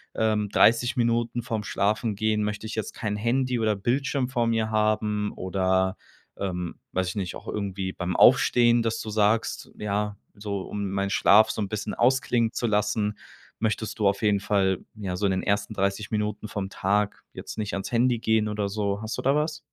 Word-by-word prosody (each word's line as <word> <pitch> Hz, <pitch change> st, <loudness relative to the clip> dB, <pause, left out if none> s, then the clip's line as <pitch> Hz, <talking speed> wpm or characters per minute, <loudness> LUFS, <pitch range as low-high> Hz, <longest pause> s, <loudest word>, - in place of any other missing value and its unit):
ähm: 105 Hz, -2 st, +1 dB
„30 120 Hz, +4 st, +4 dB
Minuten 120 Hz, 0 st, 0 dB
vorm 110 Hz, -4 st, -3 dB
Schlafengehen 105 Hz, +1 st, 0 dB
möchte 105 Hz, +1 st, -3 dB
ich 110 Hz, -, -6 dB
jetzt 110 Hz, -, -3 dB
kein 105 Hz, -2 st, -2 dB
Handy 125 Hz, +3 st, 0 dB
oder 110 Hz, -1 st, +1 dB
Bildschirm 130 Hz, +5 st, 0 dB
vor 120 Hz, -3 st, 0 dB
mir 110 Hz, -1 st, 0 dB
haben“ 105 Hz, -1 st, +1 dB
oder, 95 Hz, 0 st, 0 dB, 0.4 s
ähm 90 Hz, -3 st, -3 dB, 0.2 s
weiß 95 Hz, -1 st, -1 dB
ich 95 Hz, -, -6 dB
nicht, 95 Hz, -4 st, -3 dB
auch -, -, -11 dB
irgendwie 95 Hz, -2 st, -3 dB
beim 90 Hz, -1 st, -3 dB
Aufstehen, 120 Hz, -1 st, +5 dB
dass 115 Hz, 0 st, -1 dB
du 110 Hz, -, -6 dB
sagst: 105 Hz, +1 st, +1 dB
„Ja, 105 Hz, 0 st, -2 dB, 0.2 s
so 100 Hz, -1 st, -4 dB
um 100 Hz, 0 st, -4 dB
meinen 100 Hz, 0 st, -1 dB
Schlaf 110 Hz, +2 st, +5 dB
so -, -, -4 dB
'n -, -, -3 dB
bisschen 105 Hz, 0 st, -3 dB
ausklingen 120 Hz, -2 st, +2 dB
zu 120 Hz, -, -1 dB
lassen“ 105 Hz, 0 st, 0 dB, 0.4 s
möchtest 110 Hz, 0 st, -2 dB
du 105 Hz, -, +3 dB
auf 100 Hz, 0 st, +1 dB
jeden 105 Hz, -2 st, +3 dB
Fall, 95 Hz, -2 st, +1 dB, 0.2 s
ja, 100 Hz, -4 st, -4 dB
so 100 Hz, -, -1 dB
in 95 Hz, -, +2 dB
den 95 Hz, -, 0 dB
ersten 100 Hz, +1 st, 0 dB
30 100 Hz, +1 st, -1 dB
Minuten 105 Hz, 0 st, -2 dB
vom 95 Hz, -1 st, -4 dB
Tag 100 Hz, +2 st, 0 dB
jetzt -, -, -8 dB
nicht 105 Hz, -2 st, -3 dB
ans 100 Hz, 0 st, -4 dB
Handy 120 Hz, 0 st, +2 dB
gehen 110 Hz, -1 st, +2 dB
oder 105 Hz, -1 st, -2 dB
so. 100 Hz, 0 st, -2 dB
Hast 110 Hz, +1 st, -4 dB
du -, -, -4 dB
da 135 Hz, -, +3 dB
was? 150 Hz, 0 st, -1 dB
105 Hz, 190 wpm, -26 LUFS, 100-115 Hz, 0.4 s, Aufstehen